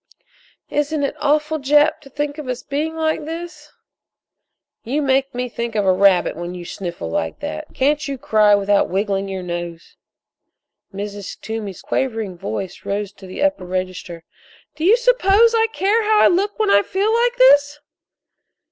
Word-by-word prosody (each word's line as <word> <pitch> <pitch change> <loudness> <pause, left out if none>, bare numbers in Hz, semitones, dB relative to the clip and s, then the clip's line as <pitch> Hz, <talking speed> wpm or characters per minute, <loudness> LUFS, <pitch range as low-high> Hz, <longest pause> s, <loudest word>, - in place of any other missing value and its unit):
"Isn't 295 0 0
it 280 - -1
awful, 300 +1 +1
Jap, 295 +3 +3
to 275 - -15
think 290 +2 -4
of 295 - -7
us 250 -1 -4
being 305 +3 -3
like 315 -1 -1
this?" 335 +2 -8 1.1
"You 265 +6 -1
make 270 -2 +1
me 250 0 -2
think 235 -1 -5
of 205 -2 +1
a 190 - +4
rabbit 190 -1 +3
when 175 +2 -6
you 175 -1 -8
sniffle 175 - -6
like 80 -1 -2
that. 75 - -5
Can't 285 +2 +1
you 275 -1 -4
cry 215 -3 +4
without 200 0 +2
wiggling 195 0 -1
your 190 -1 -4
nose?" 175 -1 -6 0.9
Mrs. 205 0 -7
Toomey's 220 -4 -6
quavering 225 -7 -2
voice 190 0 -5
rose 200 0 -3
to 195 -2 -13
the 185 +10 -4
upper 290 -9 +1
register: 185 -2 -5 0.5
"Do 310 +2 -3
you 430 +6 +6
suppose 465 -2 +4
I 450 0 +3
care 420 +3 +1
how 430 0 +3
I - - +7
look 400 +4 0
when 435 -2 +1
I 200 - +6
feel 395 - 0
like 480 +1 +1
this?" 295 -12 +5
265 Hz, 165 wpm, -20 LUFS, 195-315 Hz, 1.1 s, I